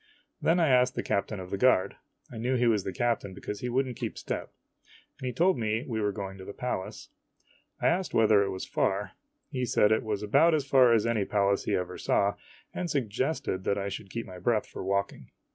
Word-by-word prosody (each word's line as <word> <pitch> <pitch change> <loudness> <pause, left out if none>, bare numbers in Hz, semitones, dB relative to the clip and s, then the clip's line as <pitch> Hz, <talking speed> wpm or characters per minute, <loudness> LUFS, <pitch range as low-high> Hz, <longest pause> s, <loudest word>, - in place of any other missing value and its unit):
Then 170 +2 +3
I 165 - +4
asked 125 0 +4
the - - -2
captain 100 +1 -1
of 90 -1 -8
the 100 - -2
guard, 125 -6 +3 0.4
I 115 - -7
knew 125 +3 0
he 125 -1 +2
was 110 -4 +2
the - - -3
captain 115 -5 -1
because 105 +2 -6
he 125 - -3
would 130 +3 +1
n't 125 - -6
keep - - -5
step, - - -4 0.7
and 130 - -4
he - - -1
told 170 +3 +2
me 110 +1 -1
we 110 -3 -2
were 105 -1 +1
going 95 -1 -6
to - - -8
the 100 - -8
Palace. 125 -7 -4 0.7
I - - -3
asked 180 +2 +2
whether 110 -2 +5
it 100 - 0
was 95 -1 -5
far. 100 +2 -1 0.4
He 130 -3 -2
said 105 -3 +3
it 110 - +3
was 105 -2 -3
about 150 +10 +4
as 145 -3 -1
far 130 -3 +5
as 115 -2 +3
any 115 -3 +1
place 100 0 +1
he - - +1
ever 90 0 -3
saw, 100 0 +2 0.4
and 180 -1 -3
suggested 130 -6 -1
that 100 - +1
I 100 0 -2
should 100 0 -7
keep 115 +4 -4
my 90 -1 -10
breath 110 +3 +1
for - - -8
walking. 100 +1 -2
110 Hz, 230 wpm, -28 LUFS, 100-125 Hz, 0.7 s, whether